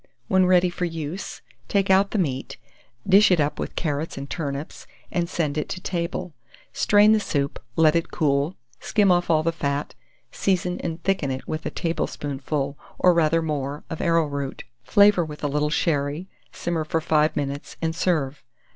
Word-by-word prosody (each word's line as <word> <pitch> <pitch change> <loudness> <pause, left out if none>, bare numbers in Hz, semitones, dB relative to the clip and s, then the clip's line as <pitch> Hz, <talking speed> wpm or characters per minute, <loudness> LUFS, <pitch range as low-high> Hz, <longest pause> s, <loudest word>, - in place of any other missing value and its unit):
When 185 -1 +4
ready 180 -1 +4
for 180 - -2
use, 165 +2 -5 0.2
take 195 -1 +2
out 195 +1 +5
the - - -2
meat, 135 -8 -2 0.5
dish 200 +2 +7
it 180 -3 +3
up 145 0 0
with - - -4
carrots 150 -1 -2
and 140 0 -5
turnips, 140 -1 -5 0.2
and 170 -1 -1
send 155 -4 -1
it - - -4
to 185 - -4
table; 175 -1 -3 0.4
strain 205 +1 +5
the 220 - +5
soup, 140 -8 -2 0.2
let 160 -1 +4
it 165 - 0
cool, 145 +3 0 0.2
skim 205 -3 +2
off 175 -1 +2
all 155 -1 +3
the 165 - +1
fat, 145 -2 -2 0.4
season 180 -2 0
and 165 -1 -5
thicken 190 -7 0
it 130 0 -4
with 155 0 -3
a - - -1
tablespoonful, 145 -3 -3 0.2
or 180 - +5
rather 165 0 +2
more, 145 -2 -3
of 160 - -4
arrowroot; 145 -5 0 0.2
flavour 200 +8 +5
with 150 -2 -8
a - - +2
little 150 +1 0
sherry, 150 +2 0 0.2
simmer 170 -2 -2
for 160 +1 -1
5 155 -1 +2
minutes, 140 0 -4
and 160 0 -1
serve. 150 -6 0
160 Hz, 175 wpm, -24 LUFS, 145-180 Hz, 0.5 s, dish